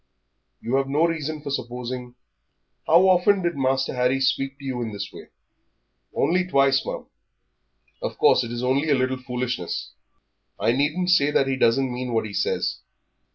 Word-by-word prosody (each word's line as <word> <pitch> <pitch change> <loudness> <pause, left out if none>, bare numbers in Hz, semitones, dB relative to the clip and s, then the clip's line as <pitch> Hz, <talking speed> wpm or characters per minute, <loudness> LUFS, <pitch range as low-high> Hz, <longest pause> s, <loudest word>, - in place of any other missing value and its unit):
"You 125 +4 0
have 135 0 -1
no 150 +4 +3
reason 155 -2 -3
for 140 - -5
supposing 125 -1 -5 0.7
How 175 +4 +6
often 185 +1 +4
did 170 -2 0
Master 135 -1 0
Harry 125 +1 +1
speak 135 +1 0
to 140 - -12
you 130 -2 -3
in 115 -2 -3
this 100 -1 -6
way?" - - -11 0.8
"Only 180 +1 +1
twice, 135 -4 +3
ma'am." - - -5 1.0
"Of - - -4
course - - +4
it 120 - -6
is 120 +1 -4
only 135 +5 +1
a 145 - +5
little 130 0 0
foolishness. 125 -7 -3 0.7
I - - +2
needn't 150 +8 +1
say 145 -5 +4
that 140 - +2
he 135 0 0
doesn't 130 +1 +2
mean 125 0 -4
what 115 -1 +1
he 105 - -7
says." - - -1
135 Hz, 170 wpm, -24 LUFS, 125-145 Hz, 1.0 s, How